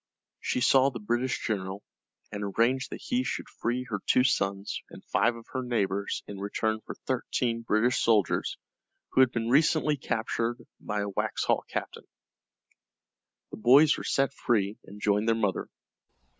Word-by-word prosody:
She 125 - -1
saw 135 +2 +5
the 125 -3 -7
British 120 +4 -1
general, 95 -2 -3 0.5
and 105 -1 -5
arranged 120 +6 +1
that - - -8
he 250 +1 0
should - - -3
free 125 +2 -2
her 105 -3 -2
two 125 - +5
sons 100 -5 0
and - - -13
five 120 - +2
of 115 -1 -11
her 130 - -1
neighbors 100 -5 -1
in 100 -1 -8
return 110 +2 -1
for - - -7
thirteen 120 -2 -1
British 115 +2 +2
soldiers 110 -5 +2 0.5
who - - +4
had 130 -2 +5
been 115 0 -2
recently 150 +2 +3
captured 115 -1 -2 0.2
by 105 -1 -3
a 100 - -2
Waxhaw 95 - 0
captain. - - -5 1.4
The - - -7
boys 140 +7 +6
were - - -6
set 135 0 +1
free, 105 -6 0
and 100 +1 -11
joined 105 +1 +1
their 115 - +4
mother. 105 -4 -1
115 Hz, 155 wpm, -28 LUFS, 105-125 Hz, 1.4 s, boys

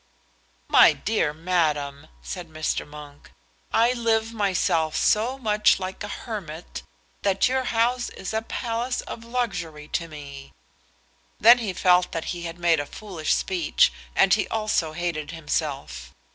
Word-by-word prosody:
"My - - +7
dear 210 -8 0
madam," 150 -4 -1 0.2
said - - -6
Mr. 155 -1 -2
Monk, 145 -1 -12 0.4
"I 235 +2 +4
live 225 -2 0
myself 185 -6 +1
so 235 +5 +2
much 210 -6 +3
like 185 +1 -5
a - - -4
hermit 190 -8 -7 0.4
that 195 -1 +2
your 260 0 0
house 240 +2 +1
is 190 - -7
a 220 - 0
palace 235 +2 -3
of 230 - -8
luxury 180 -11 -3
to 170 - -2
me." 140 -3 -10 0.9
Then 235 +3 +8
he 220 -5 -2
felt 180 0 +3
that 165 -2 -3
he 175 -1 -6
had 165 0 -6
made 170 -2 +3
a 145 - -3
foolish 180 -6 -2
speech, 175 - +2 0.2
and - - +5
he - - +2
also 215 -8 -1
hated 165 -3 -3
himself. 140 - -4
180 Hz, 145 wpm, -24 LUFS, 155-225 Hz, 0.9 s, Then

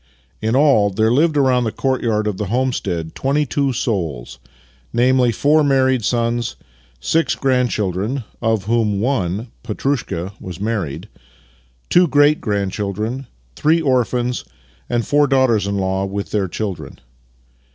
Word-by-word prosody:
In 110 +3 0
all, 135 -8 +4
there 110 +3 +1
lived 150 +4 +3
around 130 -3 +3
the 110 - -1
courtyard 115 -5 0
of 105 -3 -2
the 105 - -3
home 130 +4 0
stead 85 -7 -3
twenty 145 +2 0
two 140 +1 0
souls 85 - -3 0.3
— - - -32 0.3
namely, 125 0 +3
four 150 +7 +3
married 130 -3 +2
sons, 120 +1 0 0.4
six 160 - +1
grandchildren 125 -3 0 0.2
(of 110 -3 +1
\','hom 110 -3 +1
one 110 -2 -1
— - - -37
Petrushka 105 -6 -2
— - - -33
was 90 -1 -7
married), 100 -9 -3 0.8
two 180 0 +5
great 145 +1 +4
grandciiildren, 105 +4 -2 0.3
three 160 +2 +3
orphans, 125 -4 0 0.5
and 120 -1 0
four 145 0 +3
daughters 130 -7 +2
in 100 0 -1
law, 95 0 0
with 100 +1 -5
ilieir 100 -4 -1
children. 100 -5 -5
115 Hz, 140 wpm, -19 LUFS, 100-130 Hz, 0.8 s, two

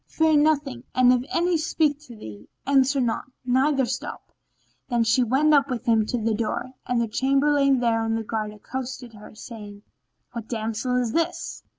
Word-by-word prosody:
Fear 315 -1 +2
nothing, 290 -4 +1
and 255 -1 +5
if 250 -1 +1
any 345 0 +2
speak 305 -2 0
to 240 - -11
thee, 105 - -11 0.2
answer 275 0 +3
not, 235 -3 -1 0.2
neither 265 +2 +2
stop." 255 +3 -6 0.6
Then 240 -1 +2
she 230 +3 +3
went 270 +6 +3
up 280 -1 +4
with 245 -4 -4
him 225 -2 +3
to 245 - -1
the 225 -1 0
door, 225 +3 -3 0.2
and 245 -1 +1
the 235 - 0
Chamberlain 275 +3 +2
there 230 -2 +2
on 225 0 -1
guard 215 -1 -3
accosted 245 +2 -7
her, 210 0 -13
saying 210 -3 -10 0.5
"What 230 -2 -7
damsel 225 +2 -2
is 245 -2 0
this?" 335 +5 -2
250 Hz, 175 wpm, -24 LUFS, 225-275 Hz, 0.6 s, and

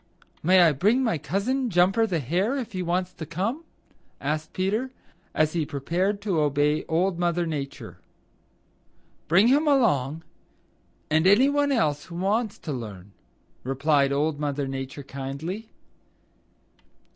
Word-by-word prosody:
"May 185 +3 +5
I 170 -2 +6
bring 210 - +2
my 225 -10 0
cousin, 250 - -1
Jumper 195 +4 +3
the 180 -5 -1
Hare, 180 - 0
if 250 -4 -5
he 185 -2 -3
wants 180 +1 -1
to - - -8
come?" 195 - -3 0.6
asked 150 +2 -3
Peter, 210 +8 -1 0.5
as 155 0 +2
he 165 -2 0
prepared 170 +8 -1
to 190 -6 0
obey 150 +1 +1
Old 175 +2 0
Mother 175 0 +1
Nature. 145 -4 -6 1.3
"Bring 190 +9 +5
him 295 +4 +3
along 160 - +2 0.9
and 160 +3 +3
any 230 +8 +6
one 285 0 +1
else 150 - +1
who 170 - -10
wants 210 +4 0
to 155 - -5
learn," 105 -6 -8 0.5
replied 140 +1 +2
Old 145 +1 0
Mother 145 -1 -2
Nature 135 +1 -6
kindly. 140 +11 -6
170 Hz, 135 wpm, -25 LUFS, 145-205 Hz, 1.3 s, I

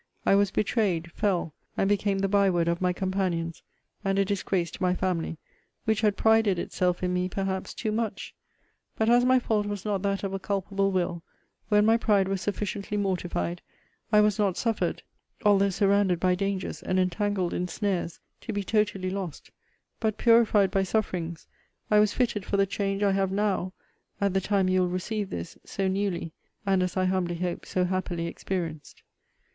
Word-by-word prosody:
I - - +5
was 200 0 +4
betrayed, 190 -5 0
fell, 180 -7 -1 0.2
and 195 - +2
became 200 -1 +1
the 195 0 +1
by 200 0 +3
word 175 -2 +1
of 170 +1 0
my 180 -1 +2
companions, 180 -3 -2 0.4
and 195 -1 0
a 195 - +3
disgrace 190 -3 -1
to - - -10
my 180 0 +2
family, 175 -3 -1 0.5
which 220 -1 +1
had 210 -2 +2
prided 220 -4 +4
itself 180 +1 -1
in 180 0 0
me 180 0 0
perhaps 190 0 -3
too 220 - -2
much. 215 -2 -3 0.6
But 220 +1 +3
as 245 +1 +5
my 255 0 +5
fault 215 -4 0
was 205 -1 -4
not 205 -3 0
that 200 -1 -1
of 195 -1 -2
a 195 - -2
culpable 195 0 -1
will, 175 -2 -1 0.5
when 210 -1 +4
my 225 +1 +5
pride 205 -4 +2
was 195 -1 -2
sufficiently 205 0 -3
mortified, 180 -3 -2 0.5
I 210 -1 +6
was 210 0 +2
not 200 -4 +1
suffered 225 -3 -1 0.4
(although 200 -1 +5
surrounded 195 -2 +2
by 185 +1 +3
dangers, 195 0 -2
and 185 0 0
entangled 185 0 0
in 180 - -1
snares) 180 -2 -2 0.2
to - - -6
be 205 -1 -2
totally 205 -2 0
lost: 190 -5 -6 0.5
but, 220 -2 0
purified 225 -4 +4
by 195 -1 +2
sufferings, 180 -5 -2 0.5
I 210 - +6
was 210 -1 +4
fitted 230 -5 0
for 200 - -1
the 195 - +4
change 195 0 -2
I 200 - +4
have 195 -1 +1
NOW, 195 -2 0 0.5
at 200 -2 +1
the 190 - +2
time 195 -1 +1
you 185 0 +3
will 180 - +1
receive 195 +3 -3
this, 85 0 -6
so 195 -1 -2
newly, 190 -4 -1 0.3
and, 195 -2 +2
as 180 +1 -1
I 185 - +2
humbly 185 -2 0
hope, 175 0 -3
so 180 -1 +1
happily 180 -2 -2
experienced. 170 -3 -5
195 Hz, 185 wpm, -27 LUFS, 180-205 Hz, 0.6 s, I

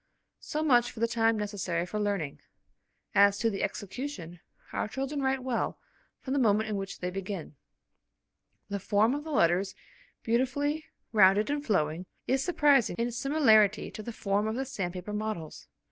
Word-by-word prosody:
So 305 +1 -3
much 245 -5 +4
for - - -11
the 230 - +2
time 225 -1 +2
necessary 195 -5 -2
for 210 +4 -4
learning. 200 -9 -2 0.7
As 200 0 +5
to 225 +2 +1
the 195 - -3
execution, 195 - -5 0.3
our - - -1
children 270 +5 -3
write 265 -1 0
well 255 -3 -1 0.4
from 265 - -3
the 280 - +2
moment 220 -2 +3
in 210 - -1
which 195 0 -5
they 180 0 -2
begin. 190 -5 -5 1.1
The 200 0 -3
form 210 +5 +2
of 290 +1 -3
the 320 - -8
letters, 190 - +2 0.5
beautifully 285 +6 0 0.3
rounded 205 +3 +5
and 290 0 -1
flowing, 175 - 0 0.2
is 265 +1 +1
surprising 285 - +3
in 235 +1 0
its 235 - -6
similarity 220 -8 +4
to - - -7
the 235 - -6
form 205 -1 0
of 220 - -2
the 265 +2 -2
sandpaper 185 -5 -4
models. 210 -7 -4
215 Hz, 165 wpm, -29 LUFS, 195-260 Hz, 1.1 s, As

